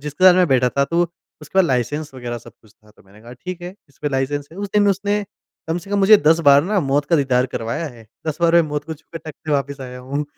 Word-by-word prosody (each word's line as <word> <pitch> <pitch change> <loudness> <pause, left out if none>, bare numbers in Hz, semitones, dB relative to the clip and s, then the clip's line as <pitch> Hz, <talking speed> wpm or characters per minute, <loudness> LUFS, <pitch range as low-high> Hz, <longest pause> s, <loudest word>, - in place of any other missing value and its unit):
जिसके 150 +5 -2
साथ 185 - +9
मैं 180 0 +4
बैठा 125 -1 +3
था 140 - +5
तो 170 +4 +1 0.4
उसके 170 +6 -3
पास 190 - +6
लाइसेंस 135 +2 -2
वग़ैरह 120 -2 -5
सब - - -15
कुछ 110 - -22
था। 105 0 -25
तो - - -23
मैंने 100 +2 -19
कहा 120 +2 -12
ठीक 180 -1 -5
है, 180 +2 -7
इस 140 - -28
पे 145 - +1
लाइसेंस 140 +1 -2
है। 175 - -11
उस 205 0 -4
दिन 210 - +5
में 205 - +4
उसने 205 +1 -1 0.4
कम 165 - 0
से 185 +3 -12
कम 205 - +1
मुझे 205 +2 +7
10 165 +2 +5
बार 140 +1 +7
ना 205 +2 0
मौत 140 0 +1
का 165 - +3
दीदार 130 -3 +2
करवाया 115 +8 -3
है। 115 -1 -15 0.2
10 155 -1 -2
बार 170 -1 +3
में 170 - +7
मौत 150 -1 -4
को 160 +1 -6
छु 155 - -24
के 165 - -5
टक्क 155 -1 -10
से 155 - 0
वापस 140 0 -1
आया 125 -1 -8
हूँ। 140 +4 -3
145 Hz, 290 wpm, -20 LUFS, 130-175 Hz, 0.4 s, साथ